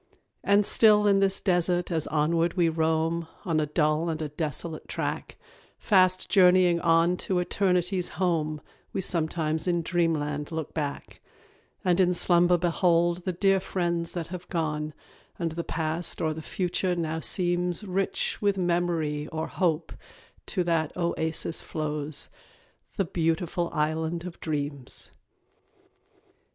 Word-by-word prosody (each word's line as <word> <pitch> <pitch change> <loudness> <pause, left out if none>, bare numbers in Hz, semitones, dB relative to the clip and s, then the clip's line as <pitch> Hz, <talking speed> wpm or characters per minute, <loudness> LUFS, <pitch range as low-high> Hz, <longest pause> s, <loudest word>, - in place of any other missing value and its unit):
And 200 +1 +4
still 210 -1 +5
in 200 -1 +4
this 195 0 +2
desert 180 -1 +1
as 160 -3 0
onward 165 +3 +1
we 175 -3 +3
roam, 160 +1 0 0.2
On 165 -4 +1
a 150 - 0
dull 155 +2 +1
and 160 -1 -2
a 155 -1 -3
desolate 155 +1 -4
track, - - -4 0.4
Fast 185 -2 +3
journeying 180 -3 +5
on 170 +1 +3
to 185 - -1
Eternity's 180 0 +1
home, 155 -5 0 0.3
We - - -1
sometimes 160 -2 -1
in 175 -1 +1
Dreamland 155 -4 -1
look 160 -2 -4
back; 145 -3 -5 0.6
And 180 0 +3
in 180 -1 +3
slumber 175 0 +4
behold 175 0 +1
the 185 - 0
dear 195 +2 +2
friends 170 -3 -2
that 170 -2 -4
have 180 0 -8
gone; 155 -3 -2 0.4
And 165 -2 -2
the 170 +1 -4
past 160 +1 -2
or 155 -1 0
the 160 - -7
future 180 +2 -1
now 160 -1 -2
seems 175 +2 0
Rich 195 -1 -1
with 200 -1 +2
memory 170 -4 0
or 160 0 -3
hope 165 -3 -1 0.5
to 185 - 0
that 165 -3 0
oasis 165 -1 -1
flown 150 -1 -4 0.9
The 195 - +1
Beautiful 170 +1 -1
Island 160 +2 -1
of 180 -1 -8
Dreams. 145 -4 -5
170 Hz, 135 wpm, -27 LUFS, 160-180 Hz, 0.9 s, still